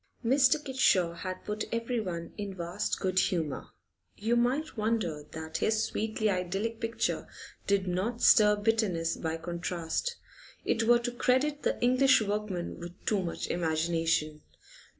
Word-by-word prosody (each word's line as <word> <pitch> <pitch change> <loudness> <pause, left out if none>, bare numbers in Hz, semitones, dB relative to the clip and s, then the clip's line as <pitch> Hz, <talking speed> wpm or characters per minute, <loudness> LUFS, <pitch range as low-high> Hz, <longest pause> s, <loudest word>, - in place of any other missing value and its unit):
Mr. 265 +4 +5
Kitshaw 195 - +3
had 185 +2 -6
put 210 0 -3
everyone 225 -8 -3
in 200 -2 -5
vast 175 +3 -2
good 185 -1 +1
humour. 160 -7 -1 0.5
You 225 +3 +1
might 255 +6 +1
wonder 210 -9 -1
that 160 0 -4
his 220 0 +1
sweetly 220 0 -1
idyllic 195 +4 -1
picture 230 0 -1 0.4
did 200 -1 +2
not 195 +7 -1
stir 210 -1 +7
bitterness 205 -6 +1
by 160 -1 -3
contrast; 170 - -3 0.5
it 230 - +1
were 240 0 +7
to 240 +1 -3
credit 260 +5 +1
the - - -1
English 255 +2 +5
workman 205 -5 -3
with 170 0 -7
too 205 -3 +1
much 170 -2 -4
imagination. 160 -2 0
205 Hz, 135 wpm, -30 LUFS, 170-230 Hz, 0.5 s, stir